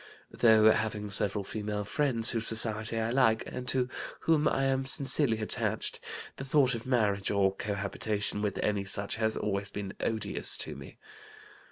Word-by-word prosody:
Though 110 -1 +5
having 110 -2 -2
several 100 +1 +2
female 105 0 -4
friends, 115 0 +2
whose 115 -1 +1
society 110 0 +1
I 115 +1 -1
like 115 -4 +2
and 125 0 -7
to 125 -1 +3 0.3
whom 155 -2 +2
I 135 - 0
am 135 0 0
sincerely 135 -2 +1
attached, 110 - -1 0.4
the - - -6
thought 135 -1 +2
of 115 +1 -6
marriage 105 -6 0
or 100 -1 +1
cohabitation 100 +1 -3
with 105 -2 -3
any 105 -1 -1
such 100 +2 +1
has 110 0 0
always 100 -1 -3
been 100 -1 -7
odious 110 -3 +2
to - - -1
me. - - -12
110 Hz, 160 wpm, -29 LUFS, 105-125 Hz, 0.4 s, Though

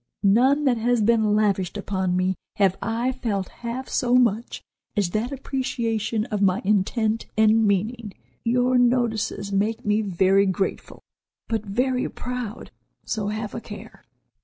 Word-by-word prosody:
None 255 +9 +4
that 250 -3 +3
has 240 +2 +1
been 220 -1 +3
lavished 200 -3 +1
upon 190 -3 -1
me 185 +1 +1 0.2
have 195 -2 +3
I 235 +3 -1
felt 220 -7 -3
half 245 +2 -4
so 245 0 +1
much 235 -2 +1 0.3
as 195 -4 +1
that 225 +6 -1
appreciation 230 -5 -2
of 210 -1 -1
my 190 -1 +3
intent 215 +2 +1
and 220 0 +4
meaning. 210 +2 -1 0.3
Your 245 +2 +2
notices 235 -5 +1
make 220 +5 -1
me 210 +1 +2
very 195 0 +3
grateful, 190 +1 -3 0.4
but 225 -2 -1
very 250 +5 0
proud, 250 -3 -6 0.3
so 210 -2 -2
have 215 0 -4
a - - -5
care." - - -11
220 Hz, 140 wpm, -24 LUFS, 200-245 Hz, 0.4 s, None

